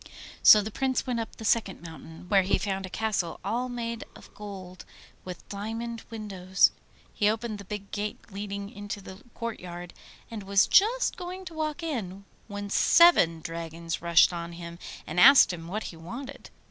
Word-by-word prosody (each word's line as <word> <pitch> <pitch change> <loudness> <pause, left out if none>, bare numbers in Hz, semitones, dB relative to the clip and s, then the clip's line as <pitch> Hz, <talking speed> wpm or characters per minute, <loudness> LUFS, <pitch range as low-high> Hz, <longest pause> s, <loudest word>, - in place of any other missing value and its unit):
So 210 - +9
the 215 - -5
Prince 265 +3 -1
went 245 -3 -1
up 225 - -5
the 220 - -9
second 205 -5 +1
mountain, 160 0 -11
where 195 +1 +4
he 190 +1 +1
found 195 -2 -3
a - - -12
castle 205 -5 -2
all 250 +2 -1
made 235 -1 -4
of - - -15
gold 190 -3 -9 0.4
with 180 -2 -9
diamond 225 +3 -5
windows. 195 -4 +1 0.4
He 205 - +2
opened 220 -1 -3
the 200 - -10
big 200 0 -7
gate 210 0 -3
leading 200 0 -5
into 205 -2 -6
the 190 +1 -11
courtyard, 180 -6 -6 0.4
and 220 -2 -5
was 195 0 +3
just 465 +6 +3
going 370 +1 -7
to 355 - -8
walk 310 +1 -3
in, 200 - -4 0.2
when 205 -1 -6
seven 190 - +5
dragons 165 0 -5
rushed 170 +1 +5
on 170 0 -5
him 170 0 -9 0.3
and 165 +3 -2
asked 265 -2 +8
him 165 -1 -8
what 210 +5 -4
he - - -12
wanted? 245 +12 -9
205 Hz, 170 wpm, -27 LUFS, 180-230 Hz, 0.4 s, So